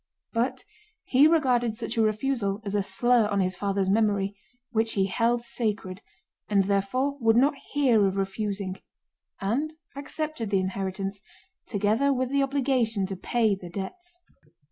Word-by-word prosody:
But 250 +2 -1 0.4
he 270 +4 +5
regarded 250 -8 +2
such 225 -1 -3
a 225 - +2
refusal 215 -2 0
as 200 - -3
a 205 - +2
slur 240 +2 +3
on 200 -1 0
his 185 -1 0
father's 195 -1 -1
memory, 200 -1 +1 0.4
which 225 -1 +1
he 195 -2 +2
held 235 +4 +1
sacred, 210 -5 -2 0.5
and 200 -2 +4
therefore 230 +9 0
would 225 -1 +4
not 270 +5 +4 0.2
hear 245 -8 +4
of 190 - -2
refusing 195 -1 -3 0.6
and 270 +11 -1 0.2
accepted 285 -4 -4
the 195 -1 +2
inheritance 195 +1 -3 0.5
together 215 +7 +2
with 260 -1 0
the 280 0 +2
obligation 260 -7 +1
to 195 0 -4
pay 220 +3 +1
the 185 -2 -7
debts. 350 - -7
220 Hz, 145 wpm, -26 LUFS, 195-255 Hz, 0.6 s, he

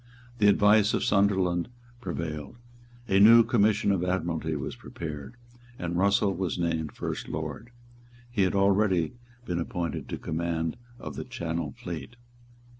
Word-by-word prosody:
The 105 - +5
advice 105 +1 +5
of - - -1
Sunderland 95 -3 +2 0.3
prevailed. 85 - -5 0.5
A 95 -2 +3
new 115 +3 +9
Commission 105 -2 +2
of 95 -3 +1
Admiralty 85 -3 -1
was 70 - -4
prepared; 75 - -7 0.4
and 85 0 -3
Russell 100 +2 +3
was 90 -1 -2
named 80 -3 -1
First - - -5
Lord. 80 +9 -5 0.6
He 115 -4 0
had 95 +1 +2
already 100 -3 +2 0.3
been 90 -4 -2
appointed 85 -2 -3
to - - -2
the - - -13
command 80 0 -2 0.2
of - - -8
the - - -3
Channel 85 - -4
fleet. 85 +7 -7
90 Hz, 140 wpm, -27 LUFS, 80-100 Hz, 0.6 s, new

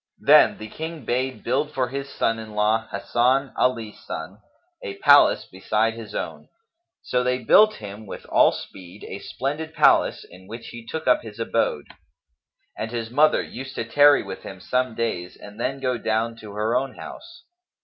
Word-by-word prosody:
Then - - +6
the 110 - -8
King 160 +2 -7
bade 130 +2 -2
build 145 +5 -1
for 130 -2 0
his 140 +1 -5
son 115 0 -1
in 110 -1 -9
law 110 +1 +1
Hasan 130 +3 +1
Ali 115 -4 0
son 90 +1 -8 0.4
a 425 -5 -6
palace - - +6
beside - - -1
his - - -9
own; - - -5 0.6
so 125 - 0
they 125 0 +1
built 215 +1 +6
him 105 0 -9
with - - -8
all - - +4
speed 95 +1 -10
a 100 - -6
splendid 150 +8 -4
palace - - +4
in 95 +1 -16
which 115 +3 -8
he 120 -1 -9
took 160 - -5
up 125 - +4
his 110 -1 -11
abode; 115 - 0 0.9
and 110 - -4
his 115 -1 -4
mother 150 +4 +4
used 135 +2 -8
to - - -3
tarry 145 +4 +5
with - - -8
him - - -9
some 125 -2 -1
days 90 -7 -3
and 105 +2 -12
then 135 +3 -2
go 130 -2 -1
down 115 +1 -1
to 105 -3 -10
her 110 +3 -1
own 130 0 -1
house. 345 +1 -11
120 Hz, 180 wpm, -23 LUFS, 110-135 Hz, 0.9 s, Then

